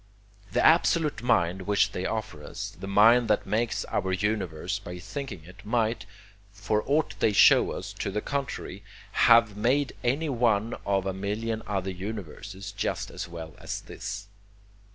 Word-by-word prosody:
The 125 - +2
absolute 160 -3 +4
mind 95 -6 +1
which 105 -1 +3
they 90 - -3
offer 110 -9 -4
us, - - -6
the 95 - -9
mind 115 +4 +5
that 105 - +1
makes 115 +2 -1
our 95 -1 -1
universe 95 -2 -1
by 90 0 -8
thinking 100 - -6
it, 95 +4 -14
might, 110 -3 0 0.4
for 105 +2 -1
aught 150 +3 +1
they 105 - +3
show - - +6
us - - -6
to - - -1
the 100 +2 -1
contrary, 140 +3 -4 0.3
have 115 -3 +5
made 130 +7 +1
any 140 +7 +1
one 115 -4 +1
of 95 -1 +1
a 95 - -1
million 110 +4 -3
other 95 -2 -2
universes 100 0 -7
just 100 - -3
as - - -5
well 80 -2 -8
as - - -4
this. 100 - -6
105 Hz, 155 wpm, -27 LUFS, 95-115 Hz, 0.4 s, show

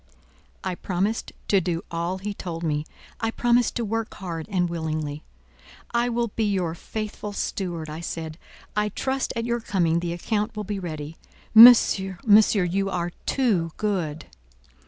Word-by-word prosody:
I 185 - -2
promised 195 +5 -2 0.2
to 195 -2 +4
do 170 -1 -2
all 170 +2 -2
he 205 +2 -4
told 170 -4 -6
me. 150 -1 -1 0.3
I 225 - 0
promised 240 +1 +2
to 235 - -1
work 225 +1 -3
hard 170 -4 -5
and 180 -3 +1
willingly. 155 -3 -3 0.7
"I 235 +1 +1
will 235 -1 0
be 220 +2 -1
your 185 -5 0
faithful 210 +3 -5
steward," 175 -5 -3
I 155 +1 -6
said; 165 -1 -5 0.4
"I 210 0 +1
trust 265 +6 -2
at 230 0 -2
your 235 0 0
coming 170 -7 +1
the 170 0 -3
account 210 +5 -2
will 210 - -3
be 205 0 -4
ready. 155 -3 -6 0.4
Monsieur, 220 -5 +8
monsieur, 210 -2 +6
you 195 +3 0
are 175 -2 -2 0.2
too 195 - +1
good!" 175 -8 -2
190 Hz, 155 wpm, -25 LUFS, 170-220 Hz, 0.7 s, Monsieur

